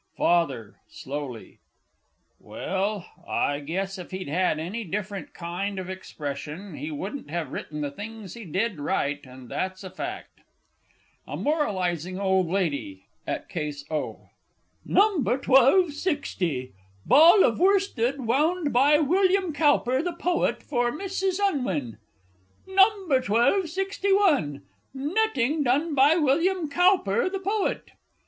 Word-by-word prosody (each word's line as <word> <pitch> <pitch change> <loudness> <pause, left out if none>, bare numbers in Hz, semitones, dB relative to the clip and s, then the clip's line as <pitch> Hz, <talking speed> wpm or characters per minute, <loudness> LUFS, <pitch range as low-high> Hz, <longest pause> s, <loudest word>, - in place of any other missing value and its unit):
FATHER 135 -11 +1
(slowly). 135 -4 -7 0.8
Well, 195 0 -3 0.2
I 145 0 0
guess 190 +6 -4
if 180 - -8
he'd 185 -5 -6
had 180 +1 +1
any 185 +9 -4
different 200 +1 -5
kind 185 +4 -4
of 185 0 -5
expression, 155 +1 -7
he 145 +2 -5
wouldn't 190 - -6
have 160 -4 -3
written 150 0 -5
the 145 -1 -2
things 210 +3 -8
he 235 - -9
did 190 +1 -2
write, 145 -1 -2
and 130 0 -12
that's 185 +6 -4
a 185 - -8
fact! 365 - -7 0.9
A - - -5
MORALISING 185 - -1
OLD 190 -2 +2
LADY 145 - -2 0.2
(at - - -3
Case 150 -4 -5
O). 155 - -4 0.5
No. 410 -1 +3
1260. 270 - +2 0.3
"Ball 335 +8 +7
of 230 - +2
Worsted 355 - +2
wound 295 +7 +1
by 280 +5 +5
William 370 +3 +2
Cowper, 285 -4 +2
the 350 +1 -3
poet, 345 +1 0
for 245 -4 0
Mrs. 385 +3 -2
Unwin." 220 - -1 0.7
No. 385 +2 +6 0.2
1261. 320 - +1 0.3
"Netting 300 - 0
done 290 +5 +1
by 285 +3 +5
William 330 +3 +2
Cowper, 355 - +3
the 390 - -3
poet." 400 +2 -2
230 Hz, 120 wpm, -26 LUFS, -, 0.9 s, Ball